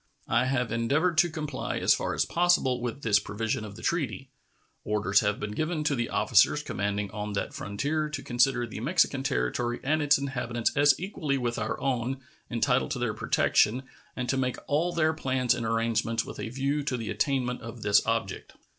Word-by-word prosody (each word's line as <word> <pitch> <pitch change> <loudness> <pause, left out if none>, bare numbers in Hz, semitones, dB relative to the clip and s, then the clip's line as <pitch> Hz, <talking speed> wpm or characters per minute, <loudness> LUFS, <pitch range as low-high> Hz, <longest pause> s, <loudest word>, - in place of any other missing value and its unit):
I 120 +2 +2
have 125 -3 0
endeavored 140 +10 +1
to 175 - +5
comply 150 -4 -4
as - - +4
far - - -2
as - - +1
possible 170 -8 +2
with 125 +3 -4
this 105 -2 +4
provision 110 +2 -3
of 105 -2 -8
the 115 - -11
treaty. 135 - -2 0.5
Orders 105 -2 +2
have 105 -1 0
been 105 0 -4
given 155 +7 -2
to 150 - +1
the 120 -3 -1
officers - - +3
commanding 100 0 -2
on 105 0 -4
that 100 - -3
frontier 145 +10 -2
to 150 -2 -5
consider 120 0 +2
the 110 - -7
Mexican 140 +1 +2
territory 125 -3 -1
and 155 +3 +1
its 145 0 +4
inhabitants 125 -3 -2
as 145 -1 +4
equally 160 -7 -2
with 120 -2 -2
our 110 0 -2
own 130 0 -1 0.3
entitled 125 +3 +1
to 145 - -2
their 120 -3 -1
protection, 120 +5 +2 0.3
and 125 -1 -3
to 135 - 0
make 130 -1 -1
all 160 +5 +1
their 160 -2 +2
plans 130 -5 +1
and 115 - -3
arrangements 115 0 0
with - - -9
a - - -4
view 140 +4 -1
to 140 -3 -2
the 115 -3 -4
attainment 130 -3 -1
of 115 -1 -8
this 105 0 +4
object. 115 -4 -2
125 Hz, 190 wpm, -28 LUFS, 115-145 Hz, 0.5 s, to